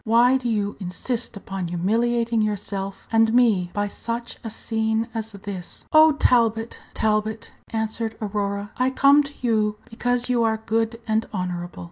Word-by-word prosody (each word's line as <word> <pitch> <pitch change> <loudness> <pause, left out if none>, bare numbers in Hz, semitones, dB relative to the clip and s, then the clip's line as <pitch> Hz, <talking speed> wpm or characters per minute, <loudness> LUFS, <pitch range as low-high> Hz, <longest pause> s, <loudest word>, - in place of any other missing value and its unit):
Why 240 +4 +5
do 245 -2 -3
you 205 -2 -1
insist 215 +5 -3
upon 195 -2 -5
humiliating 230 +6 +1
yourself 200 -2 -3
and 225 0 +4
me 225 -7 +3
by 205 +1 -1
such 235 +3 -5
a 225 - -4
scene 220 0 -1
as 225 -1 -4
this?" 195 -2 -8
"Oh, 310 0 +8
Talbot, 230 -5 +2 0.2
Talbot!" 215 0 0 0.2
answered 220 0 -2
Aurora, 205 -1 -2
"I 255 +1 +2
come 280 +2 +5
to 285 0 -7
you 215 -3 +1
because 245 +1 0
you 245 -2 +2
are 220 -1 +2
good 225 +1 0
and 220 0 +1
honorable. 180 -3 -4
220 Hz, 150 wpm, -23 LUFS, 205-235 Hz, 0.2 s, Oh